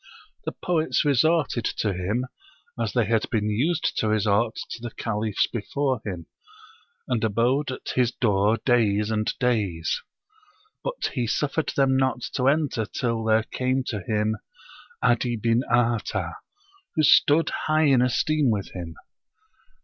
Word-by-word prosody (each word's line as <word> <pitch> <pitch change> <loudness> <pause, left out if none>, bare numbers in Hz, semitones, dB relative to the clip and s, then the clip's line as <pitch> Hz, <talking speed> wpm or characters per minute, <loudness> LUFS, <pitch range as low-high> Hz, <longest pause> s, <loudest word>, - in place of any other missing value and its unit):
the - - -2
poets 165 -2 0
resorted 145 -2 +2
to 105 -1 -1
him, 100 +8 -2 0.5
as - - -1
they 120 -3 +2
had 110 0 0
been 105 -3 0
used 155 +10 0
to 110 - 0
resort 110 +1 +1
to 120 - -7
the 120 - -4
Caliphs 110 -2 -1
before 130 +3 -2
him, 90 -5 -5 0.8
and 115 -3 -1
abode 120 +7 +1
at 130 - -6
his 125 -2 +2
door 105 -2 +2
days 105 -4 +2
and 110 -1 0
days; 105 -10 0 0.8
but - - -3
he 120 -3 -1
suffered 145 +6 -1
them 135 -1 +3
not 130 -2 +1
to 130 -1 +1
enter 140 -7 +1
till 115 +5 -2
there 110 0 +3
came 130 +3 -1
to 105 - -3
him 105 +2 0 0.7
'Adi 120 0 +2
bin 115 +2 +1
Artah, 120 -2 +1 0.6
who 155 - +2
stood 150 +2 +5 0.2
high 155 0 +3
in 135 -4 +4
esteem 140 +3 +2
with 100 -3 -2
him. 85 -3 -7
120 Hz, 140 wpm, -25 LUFS, 105-130 Hz, 0.8 s, stood